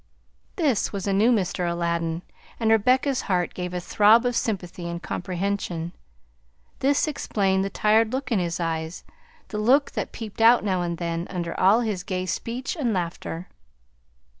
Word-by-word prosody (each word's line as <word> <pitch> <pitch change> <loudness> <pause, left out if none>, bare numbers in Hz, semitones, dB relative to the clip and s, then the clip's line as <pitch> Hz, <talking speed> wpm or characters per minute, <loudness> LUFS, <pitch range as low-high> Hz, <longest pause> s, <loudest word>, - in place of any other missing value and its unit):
This 290 - +1
was 200 -2 -4
a 200 - +1
new 215 +5 +4
Mr. 185 -5 0
Aladdin, 170 0 -1 0.4
and 225 -1 +2
Rebecca's 255 +5 +3
heart 180 -2 +1
gave 180 -1 -4
a 180 - -2
throb 215 +6 +4
of 245 -1 0
sympathy 180 -6 -2
and 170 0 -4
comprehension. 180 -2 -3 0.9
This 280 +3 +2
explained 195 -9 0
the 195 - -2
tired 215 +2 +3
look 265 0 -3
in 220 - +3
his 170 -1 -2
eyes, 165 0 -3 0.5
the 210 - -3
look 265 +7 +3
that - - -4
peeped 225 -2 -7
out 230 0 +6
now 190 -3 0
and 170 -1 -2
then, 170 0 -3
under 170 -2 -3
all 200 +6 +5
his 210 -6 -2
gay 185 -1 -3
speech 235 - -3
and 255 -9 0
laughter. 175 -1 -4
195 Hz, 165 wpm, -25 LUFS, 175-230 Hz, 0.9 s, out